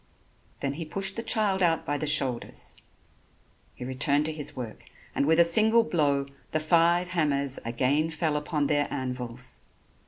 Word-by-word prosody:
Then 140 0 -1
he 165 +4 -5
pushed 195 +4 -1
the 230 - -3
child 210 -5 +1
out 165 -2 +2
by 145 0 -1
the 155 - -2
shoulders. 135 -5 0 1.0
He 125 - -8
returned 140 +3 +1
to 160 - -1
his 150 -2 -3
work 120 -4 -8 0.3
and 140 - 0
with 160 +1 +4
a - - +9
single 220 +7 +5
blow 145 -8 0 0.3
the 155 - +2
five 170 +2 +2
hammers 140 -6 0
again 130 +7 0
fell 155 -1 -1
upon 150 0 -1
their 145 0 0
anvils. 125 -2 -4
150 Hz, 160 wpm, -27 LUFS, 140-170 Hz, 1.0 s, a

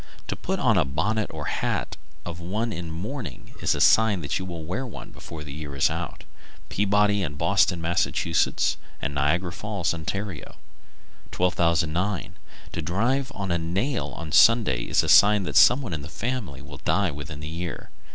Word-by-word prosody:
To - - -1
put - - -3
on - - +4
a - - +4
bonnet 105 +11 -1
or 75 -2 -6
hat - - -2 0.3
of 85 -1 -6
one 105 +7 -2
in 85 0 -5
mourning 90 - -6
is - - +2
a - - -3
sign 110 -5 +5
that 70 - -2
you 95 - -5
will 85 -3 -6
wear 95 +11 -3
one 125 - -9
before 80 -2 -9
the 70 -2 -8
year 75 -2 -7
is 70 - +3
out. - - -5 0.5
Peabody 105 0 +2
and 75 -5 -3
Boston, 95 0 +3
Mass., 85 -1 +1
and 75 -1 -1
Niagara 85 +6 +1
Falls, 100 -3 -2
Ont. 80 -1 -3
1209. 90 -1 -2 0.4
To - - -3
drive 120 - 0
a 95 -4 -1
nail 95 - -1
on 80 -2 -6
Sunday 105 - +5
is - - +2
a - - -3
sign 105 -1 +6
that - - -5
some 130 +3 +7
one 100 - -5
in 80 - -3
the 75 - -8
family 115 - -4
will - - -10
die 95 -3 +1
within 70 0 -7
the 75 - -6
year. 85 +1 -6
85 Hz, 175 wpm, -25 LUFS, 80-105 Hz, 0.5 s, some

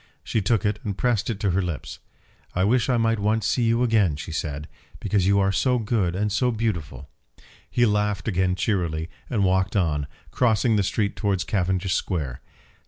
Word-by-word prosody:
She 110 - -1
took 100 +2 +1
it 105 0 0
and 100 -2 -3
pressed 120 -5 +1
it 110 -4 -3
to 100 - +1
her 95 +3 +1
lips. 85 -7 -5 0.6
"I 90 - +2
wish 120 +5 +2
I 125 - +3
might 115 -1 +1
once 105 +1 +1
see 125 - +1
you 115 +2 +2
again," 105 -10 +3
she 75 +3 -7
said, 75 -1 -4 0.3
"because 100 -2 +1
you 100 0 +4
are 95 0 +2
so 125 +6 +2
good 105 -6 0
and 105 +2 0
so 125 +5 +2
beautiful." 85 - -3 0.6
He 120 - +3
laughed 105 -1 0
again 95 -3 +1
cheerily, 85 -5 -1 0.2
and 110 -5 +1
walked 95 +1 +1
on, 75 -7 +1 0.2
crossing 115 -1 +2
the 105 - +3
street 100 +1 -1
towards 100 -4 0
Cavendish 95 -1 0
Square. 75 -10 -2
100 Hz, 185 wpm, -24 LUFS, 90-110 Hz, 0.6 s, you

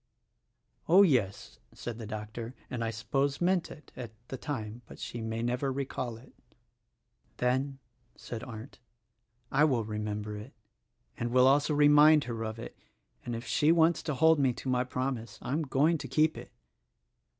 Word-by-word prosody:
"Oh, 190 +4 +8
yes," 120 - 0 0.2
said 120 -1 -6
the 110 - -6
doctor, 110 +3 -6 0.2
"and 120 -2 -2
I 115 - -1
suppose 135 +6 -1
meant 180 0 +1
it, 150 -4 -13
at 120 -3 -6 0.2
the - - -4
time; 120 -4 -5
but - - -12
she 120 - -6
may 110 +1 -3
never 125 +3 0
recall 130 -3 -3
it." 120 - -17 1.0
"Then," 130 +2 0 0.4
said 115 -1 -7
Arndt, 115 +1 -9 0.7
"I 140 +2 +4
will 130 -7 +3
remember 105 0 -4
it, 110 +7 -10 0.7
and 120 - -1
will 125 +1 +5
also 145 +3 +4
THE - - -1
RECORDING 145 0 +6
ANGEL 150 0 +7
39 - - +9
remind 155 -2 +6
her 115 -3 -4
of 110 0 -5
it - - -19 0.3
— - - -37
and 120 - -3
if 115 +2 -6
she 150 +2 +3
wants 165 0 +4
to 155 -3 -3
hold 160 +2 +5
me 130 -3 +3
to 130 - -8
my 125 -1 +2
prom 130 0 -2
ise, 115 - -12
I'm 145 +5 -2
going 150 +3 +2
to - - -6
keep 155 0 +2
it." - - -10
130 Hz, 185 wpm, -30 LUFS, 115-145 Hz, 1.0 s, 39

